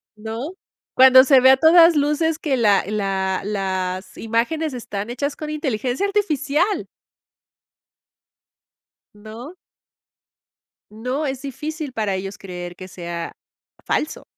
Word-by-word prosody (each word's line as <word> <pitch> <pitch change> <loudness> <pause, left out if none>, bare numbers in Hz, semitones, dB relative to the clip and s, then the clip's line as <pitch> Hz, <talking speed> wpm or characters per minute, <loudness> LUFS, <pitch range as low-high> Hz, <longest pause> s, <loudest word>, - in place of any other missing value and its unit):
¿No? 225 - -6 0.4
Cuando 260 0 +8
se 270 -1 +6
ve 260 +1 +7
a 265 - +5
todas 330 +2 +6
luces 300 +3 +1
que 275 -5 -1
la 205 -4 +3
la 195 -2 -1
las 190 -2 -3
imágenes 255 +8 -1
están 210 -3 -5
hechas 280 +3 -3
con, 305 - -7
¡inteligencia 265 - -2
artificial! 355 -2 0 2.3
¿No? 220 - -10 1.4
No, 250 +7 -3
es 265 0 -4
difícil 300 +1 -6
para 215 -4 -1
ellos 195 +2 -5
creer 175 -2 -8
que 185 0 -10
sea 170 -2 -6 0.5
falso. 305 - -2
250 Hz, 115 wpm, -21 LUFS, 200-300 Hz, 2.3 s, Cuando